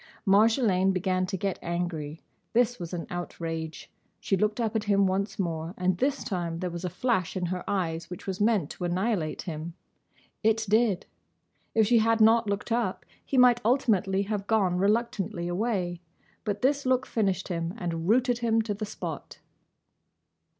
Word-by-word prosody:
Marjolaine 200 -2 +4
began 185 0 0
to 190 - -3
get 195 0 -2
angry. 170 -3 -3 0.3
This 245 +1 +2
was 170 -2 -6
an 175 -2 -4
outrage. 165 -2 -5 0.3
She 195 - 0
looked 210 +4 0
up 225 -2 -1
at 220 - 0
him 200 -1 +3
once 195 +2 -1
more, 165 -2 -3
and 185 0 +1
this 275 +1 0
time 170 -4 -3
there 180 0 -3
was 170 +1 -6
a 180 - -1
flash 185 -1 0
in 180 - -1
her 180 +1 -3
eyes 170 -4 -1
which 180 - -8
was 190 0 -3
meant 205 -8 +2
to - - -7
annihilate 180 -2 -1
him. 165 0 -6 0.7
It 220 0 +2
did. 215 -2 +2 0.7
If 220 -1 +5
she 235 +2 +4
had 225 +1 +3
not 225 0 +5
looked 200 +3 -3
up, 230 -5 -1 0.2
he 270 - -2
might 245 -1 +6
ultimately 200 -5 +2
have 205 -1 -3
gone 195 -5 +2
reluctantly 200 -4 0
away. 180 -2 -1 0.4
But 205 0 -2
this 285 +2 +2
look 255 0 +2
finished 195 -4 -1
him 170 +1 -2
and 170 -3 -3
rooted 245 +1 +3
him 225 -1 +2
to 215 -1 -2
the 210 +1 -5
spot. 210 - -6
195 Hz, 170 wpm, -28 LUFS, 175-225 Hz, 0.7 s, might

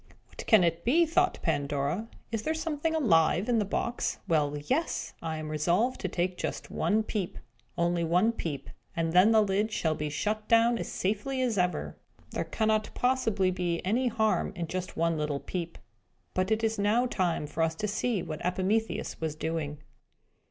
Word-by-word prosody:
"What - - -10
can 220 -6 +6
it 170 0 0
be?" 325 +8 +4
thought 360 +3 +2
Pandora. 145 +5 -1 0.2
"Is 225 -2 -1
there 315 +7 -1
something 320 0 -1
alive 180 - +3
in 240 -2 +3
the 210 - +1
box? 235 +4 -2
Well 150 -3 +1
yes! 265 - -1
I 160 -1 -3
am 155 0 -5
resolved 175 - +1
to 190 - -1
take 180 0 -2
just - - -4
one 205 +7 +1
peep! 205 -4 -3 0.4
Only 170 0 +1
one 180 +7 +3
peep; 150 - -5 0.2
and 165 -1 0
then 180 +4 +7
the 220 -1 +5
lid 205 +2 0
shall 160 -6 0
be 150 -1 -3
shut 210 +8 -2
down 230 +1 +4
as - - -4
safely 215 +8 -1
as 240 -3 +1
ever! 180 0 -1 0.3
There - - -1
cannot 215 -1 +1
possibly 225 -7 +2
be 175 -2 -1
any 240 +7 +2
harm 220 -3 +1
in 175 -2 -2
just 185 +2 -5
one 165 -1 +1
little 150 -2 -1
peep!" 170 0 -5 0.6
But 185 +1 0
it 220 0 +1
is 225 -1 0
now 215 +5 +3
time 180 -10 0
for 150 - -4
us 165 0 +1
to 210 - -2
see 215 -1 -1
what 155 0 -6
Epimetheus 190 +5 -1
was 160 -2 -2
doing. 155 -2 -3
185 Hz, 180 wpm, -29 LUFS, 165-225 Hz, 0.6 s, then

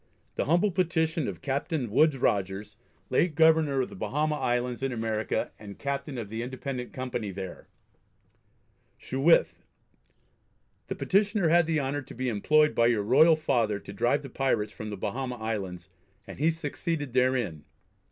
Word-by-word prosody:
The - - -1
humble 175 +7 +3
Petition 160 -4 0
of 90 -4 -6
Captain 140 - -2
Woodes 150 +4 +4
Rogers, 100 -2 -1 0.4
late 160 +4 +2
Governor 160 -4 +4
of 125 - -3
the - - -10
Bahama 150 +10 -1
Islands 125 -3 -1
in 135 0 -1
America, 110 -2 -2
and 100 -2 -10
Captain 140 0 -3
of 115 -3 -4
the 110 +2 -4
Independent 125 0 -5
Company 125 -5 -4
there, 95 -1 -7 1.3
Sheweth: 140 +6 +2 1.2
The - - -3
Petitioner 200 -2 +2
had 170 0 +4
the 160 -2 +1
honour 140 +1 -2
to 130 - -12
be 130 +1 -1
employed 150 +8 +3
by 115 - +4
your 115 -4 +2
royal 155 +9 +6
Father 120 -9 0
to 100 - -10
drive 120 +8 +1
the 135 - -8
Pirates 110 -6 0
from 110 - -7
the 105 - -5
Bahama 125 +5 -3
Islands, 100 -6 -4 0.4
and 95 +2 -10
he 155 +3 +3
succeeded 160 -3 -3
therein. 125 - +1
130 Hz, 155 wpm, -28 LUFS, 110-155 Hz, 1.3 s, royal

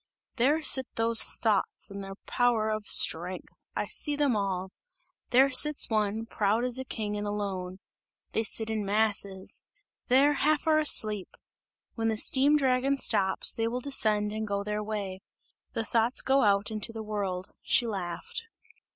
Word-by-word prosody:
"There 290 +6 +1
sit 265 -3 +5
those 225 0 +3
thoughts 210 -3 -2
in 200 0 -7
their 195 0 -9
power 235 -3 0
of 215 -1 -5
strength! 175 +3 +2 0.2
I - - -2
see 295 -2 0
them 285 -5 0
all! 190 -2 -3 0.6
There 265 +3 +4
sits 290 0 +5
one, 215 +1 -1
proud 220 +1 -1
as 250 0 +2
a - - -4
king 215 -5 -5
and 205 0 -4
alone! 190 -3 -5 0.5
They - - -1
sit 225 0 0
in 215 -1 -3
masses! 200 -2 -1 0.4
There, 275 +4 +3
half 295 +2 0
are 310 -1 +3
asleep! 215 -10 +3 0.6
When 225 -1 -3
the 220 -1 -1
steam 280 +6 +3
dragon 270 0 0
stops, 190 -7 +2
they 225 0 -2
will 245 +2 -3
descend 215 -6 +2
and 220 0 -5
go 200 -1 -3
their 210 +1 -4
way! 205 -3 -6 0.5
The 225 - -3
thoughts 230 +2 0
go 270 +1 +2
out 200 -1 +1
into 215 +1 -5
the 225 -1 -8
world!" 200 -3 -5
She 240 - +2
laughed. 195 - -5
220 Hz, 160 wpm, -27 LUFS, 200-255 Hz, 0.6 s, sit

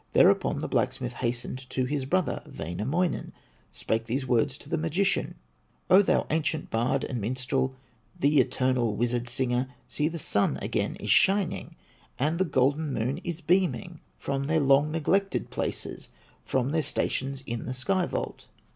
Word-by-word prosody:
Thereupon - - +4
the - - -3
blacksmith 125 -1 -1
hastened 125 +2 -3
To 130 - 0
his 140 0 -2
brother, 180 +3 0
Wainamoinen, 135 - -2 0.4
Spake 115 +1 -2
these 130 +4 -2
words 125 +2 +1
to - - -12
the - - -1
magician: 170 +5 0 0.6
"O 190 +2 +9
thou 205 - +2
ancient 155 -1 -1
bard 120 +4 +1
and 125 -4 -3
minstrel, 130 +3 -1 0.4
The 145 +1 +4
eternal 125 -3 +1
wizard 120 +1 0
singer, 125 0 0 0.2
See, 150 - 0
the 170 +1 -4
Sun 100 -9 +1
again - - -1
is - - -2
shining, 195 -2 +3 0.4
And 155 +6 0
the 190 - +3
golden 145 +1 +1
Moon 130 +5 -1
is 175 -2 -5
beaming 180 -1 +1 0.2
From 135 0 -2
their 160 +1 +2
long 140 +1 +4
neglected 195 +5 0
places, - - -3 0.3
From 130 +1 0
their 160 +1 +2
stations 135 -2 -1
in 120 0 -4
the 130 - -3
sky 180 +8 +1
vault!" - - -4
135 Hz, 155 wpm, -27 LUFS, 125-160 Hz, 0.6 s, O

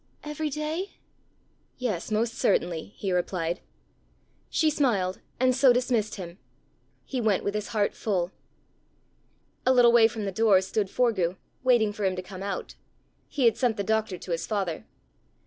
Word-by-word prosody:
"Every 300 +1 -3
day?" 305 +6 -3 0.8
"Yes, 220 -9 -2
most 225 +2 0
certainly," 170 +3 0
he 195 - -2
replied. 175 -1 -1 0.9
She 315 -2 +2
smiled, 205 -11 0 0.2
and 255 0 +3
so 260 0 +6
dismissed 245 -3 +1
him. 180 -1 -8 0.7
He 260 -3 -3
went 215 -4 +2
with 200 - -1
his 210 0 -3
heart 215 -4 0
full. 185 -4 -1 1.3
A 255 - +4
little 245 -2 +6
way 235 -1 +7
from 225 -2 -5
the 195 - -2
door 210 -1 +4
stood 195 +1 -1
Forgue, 190 -8 +1 0.2
waiting 240 -5 +3
for 210 - -5
him 190 -1 +1
to 185 - -5
come 185 0 -9
out. 195 -1 -4 0.5
He 270 -4 0
had 230 - +4
sent 240 -4 +1
the 200 - -1
doctor 220 -2 0
to 175 - -8
his 165 - -2
father. 195 -7 -2
215 Hz, 160 wpm, -27 LUFS, 190-245 Hz, 1.3 s, way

